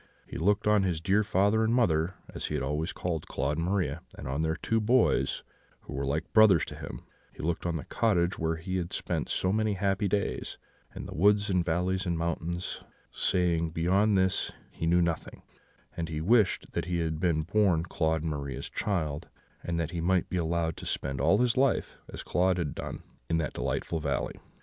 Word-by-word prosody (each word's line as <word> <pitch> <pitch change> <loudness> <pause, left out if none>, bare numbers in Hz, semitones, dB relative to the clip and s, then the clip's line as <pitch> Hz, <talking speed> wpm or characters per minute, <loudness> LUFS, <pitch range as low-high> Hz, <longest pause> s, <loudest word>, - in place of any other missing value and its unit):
He - - -7
looked 100 +5 +2
on 105 -1 +4
his 90 -4 0
dear 100 +6 +2
father 105 +2 +2
and 115 +2 +2
mother, 90 -7 +2 0.2
as - - -4
he - - -1
always 75 +6 -2
called 85 -4 -3
Claude 70 +2 -1
and 85 - -1
Maria, 90 -5 0 0.2
and - - -7
on 70 +4 -1
their 80 0 0
two 115 +6 0
boys, 105 - +2 0.4
who - - -9
were 70 -1 -2
like 75 +3 -2
brothers 110 -8 +6
to - - -8
him; - - -7 0.3
he - - -10
looked 85 +1 -1
on 85 - -1
the 75 - -3
cottage 90 -6 +1
where 80 0 0
he 95 +3 -3
had 85 -2 -3
spent - - -2
so 95 +1 0
many 110 -1 +1
happy 100 +1 0
days, 100 +1 -2 0.3
and - - -7
the - - -7
woods 100 +3 +3
and 90 -2 +2
valleys 90 +3 0
and 85 -1 0
mountains, 85 +1 -3 0.3
saying, 85 -3 +1
beyond 95 +6 +2
this 95 0 +1 0.2
he 80 - -3
knew 85 +1 +4
nothing; 85 -2 -3 0.5
and 85 -1 -3
he 80 -1 -3
wished 105 +4 +2
that - - -2
he 90 0 -1
had 80 -2 -1
been 80 -3 +1
born 90 -2 +2
Claude 80 -2 0
and 80 - -1
Maria's 70 -3 -5
child, 80 -6 -2 0.3
and 85 -1 -2
that 85 -1 -2
he 85 -2 -3
might 90 +1 +1
be 90 - 0
allowed 85 -1 0
to - - -8
spend 70 -1 -2
all 100 - +4
his 120 0 +2
life, 135 0 +1 0.2
as - - -7
Claude 90 0 +2
had 85 -5 -2
done, - - -6 0.3
in 80 - +2
that 80 -4 -2
delightful 80 - -2
valley. 75 -2 -2
85 Hz, 200 wpm, -29 LUFS, 80-100 Hz, 0.5 s, brothers